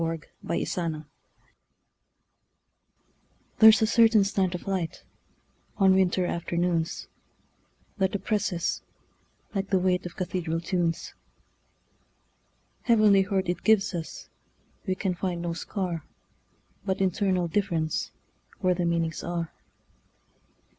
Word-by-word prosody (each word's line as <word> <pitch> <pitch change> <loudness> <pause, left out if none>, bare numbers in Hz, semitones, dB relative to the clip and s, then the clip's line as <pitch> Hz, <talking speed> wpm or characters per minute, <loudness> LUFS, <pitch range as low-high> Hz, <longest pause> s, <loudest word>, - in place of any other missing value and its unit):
Part 165 -1 -2
Two: - - -23
Nature 180 - -2
LXXXII 155 -2 -3 2.5
THERE'S 220 0 +8
a - - +5
certain 225 -1 +5
slant 195 -2 0
of 180 - -7
light, 190 -4 -3 0.7
On 195 -2 +5
winter 185 -1 +2
afternoons, 170 -1 -1 0.9
That 190 0 +1
oppresses, 195 -3 -1 0.7
like 195 -1 -2
the 195 - +3
weightOf 180 -1 0
cathedral 175 -3 -2
tunes. 170 -1 -1 1.7
Heavenly 215 -4 +5
hurt 190 -1 0
it 175 - -2
gives 210 -3 +3
us; 165 -2 -6 0.6
We 185 - +1
can 190 -1 -1
find 175 0 -3
no 170 -1 -2
scar, 175 -2 -3 0.8
But 190 -1 -1
internal 185 -1 +1
differenceWhere 170 - -2
the 175 -1 -1
meanings 165 -1 -1
are. 170 -1 -3
180 Hz, 105 wpm, -27 LUFS, 170-195 Hz, 2.5 s, THERE'S